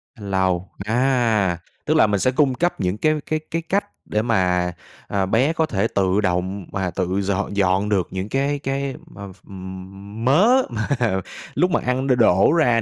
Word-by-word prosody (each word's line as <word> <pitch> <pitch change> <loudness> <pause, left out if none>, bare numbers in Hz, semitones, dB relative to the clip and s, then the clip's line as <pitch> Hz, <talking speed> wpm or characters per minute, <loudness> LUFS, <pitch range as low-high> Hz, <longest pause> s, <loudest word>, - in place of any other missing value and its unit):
Cách 105 -5 -10
lau. 95 -2 0
À, 115 -6 +2 0.3
tức 155 - +2
là 110 - +5
mình 100 -1 0
sẽ 130 - +2
cung 135 0 +2
cấp 175 +6 -1
những 90 +2 -1
cái 155 +6 +2
cái 155 - -1
cái 165 - -1
cách 195 +5 -1 0.2
để 105 - 0
mà, 90 -6 +1 0.4
ờ, 100 -1 0
bé 125 - +2
có 160 -1 +1
thể 110 -7 0
tự 95 -1 +1
động 95 0 -1
mà 95 -2 -2
tự 95 +3 -1
dọn 100 +1 -2
dọn 95 +1 +2
được 95 -4 +1
những 95 +2 -4
cái 140 +3 0
cái 135 0 -3
m - - -18
ph - - -13 0.3
ừm, 95 +3 -9
mớ 210 - +5
mà 110 -2 -3 0.7
lúc 180 +1 +2
mà - - +2
ăn 130 +2 0
đ - - +2
đổ 105 +1 +4
ra 120 -8 +3
105 Hz, 190 wpm, -21 LUFS, 95-135 Hz, 0.7 s, là